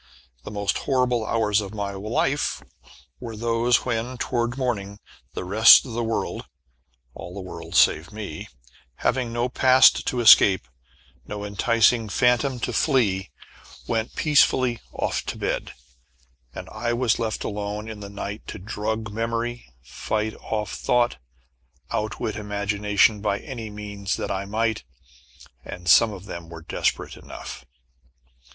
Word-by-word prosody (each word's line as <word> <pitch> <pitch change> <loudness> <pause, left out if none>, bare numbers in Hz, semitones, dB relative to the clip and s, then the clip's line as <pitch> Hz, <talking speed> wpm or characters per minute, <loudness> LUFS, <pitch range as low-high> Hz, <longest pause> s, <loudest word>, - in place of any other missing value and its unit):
The - - -7
most 100 -1 -1
terrible 125 -4 +1
hours 110 -2 +2
of 100 +1 -8
my 100 -1 -3
life 115 +8 -1 0.6
were 115 -2 -7
those 115 +2 +1
when, 120 +1 -2
toward 120 0 -1
morning, 100 -6 -2 0.4
the - - -3
rest 105 +5 +7
of 125 - -8
the 120 +1 -1
world 115 0 -3 0.7
all 85 +1 -9
the - - -6
world 85 -2 -8
save 80 +3 +4
me 105 -7 -7 0.6
having 125 -2 +1
no 120 +1 0
past 130 +1 +5
to 125 - 0
escape, 100 - +7 0.6
no 105 -1 -5
enticing 115 +2 +2
phantom 125 +4 +2
to - - -2
flee, 100 -10 +1 0.6
went 115 -1 -2
peacefully 130 -5 +3
off - - -2
to - - -4
bed, - - -2 0.8
and - - -8
I 120 +2 -2
was 120 -2 +1
left 110 -2 -2
alone 105 +1 -4
in 110 -2 -7
the 100 -1 -8
night 100 +1 -7
to - - -6
drug 110 +2 -4
memory, 115 - -3
fight 110 - -3
off 105 -3 -3
thought, 120 -1 +1 0.7
outwit 105 0 -2
imagination 105 0 +1
by 100 -1 0
any 115 -3 -7
means 105 -2 -4
that - - -3
I 95 0 -2
might 110 - -1 0.8
and 90 -1 -9
some 110 +7 +6
of 95 -2 -9
them 85 -4 -8
were 80 -1 -10
desperate - - -2
enough. - - -9
110 Hz, 140 wpm, -24 LUFS, 100-120 Hz, 0.8 s, rest